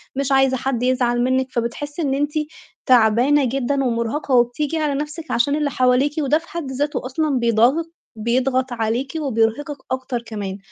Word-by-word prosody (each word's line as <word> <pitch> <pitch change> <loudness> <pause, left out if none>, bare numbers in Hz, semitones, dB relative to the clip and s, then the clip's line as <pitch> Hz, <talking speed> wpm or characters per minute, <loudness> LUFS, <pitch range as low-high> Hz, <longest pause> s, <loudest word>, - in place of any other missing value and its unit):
مش 275 0 -1
عايزة 270 -1 +3
حد 250 -1 -2
يزعل 245 -1 +1
منِّك، 260 0 +1
فبتحسّي 290 +7 -3
إن 280 -4 0
أنتِ 290 +2 0 0.5
تعبانة 250 +4 +4
جدًا 275 +2 0
ومُرهقة 240 +4 -1
وبتيجي 245 +6 +1
على 305 -2 0
نَفْسِك 300 +3 -5
عشان 280 +5 +2
اللي 295 -1 0
حواليكِ، 255 +2 +2
وده 295 +1 +2
في 335 +1 -11
حد 320 -6 -5
ذاته 285 0 -2
أصلًا 275 +1 0
بيضاغِط 240 +8 +2 0.2
بيضغط 255 +3 0
عليكِ 235 +4 -2
وبيرهقِك 275 +2 0
أكتر 260 -2 -2
كمان. 205 -4 -6
260 Hz, 155 wpm, -21 LUFS, 240-290 Hz, 0.5 s, تعبانة